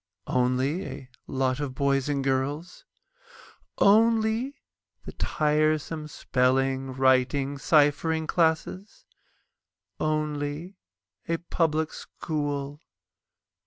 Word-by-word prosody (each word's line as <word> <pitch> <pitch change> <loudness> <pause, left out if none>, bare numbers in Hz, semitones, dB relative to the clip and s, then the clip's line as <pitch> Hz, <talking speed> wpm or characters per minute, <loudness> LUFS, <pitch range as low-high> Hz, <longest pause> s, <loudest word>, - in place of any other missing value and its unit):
Only 130 +7 0
a 130 - -8 0.2
lot 130 0 0
of 140 -3 -4
boys 140 0 +1
and 140 -2 0
girls? 140 +6 -2 0.9
Only 225 +5 +3 0.5
the - - -6
tiresome 155 0 0
spelling, 135 -1 0
writing, 130 +2 +2
ciphering 155 +2 +2
classes? 165 +5 -1 0.9
Only 155 +3 -2 0.5
a 165 - +1
Public 160 -2 -1
School? 145 -2 -4
150 Hz, 80 wpm, -26 LUFS, 135-160 Hz, 0.9 s, Only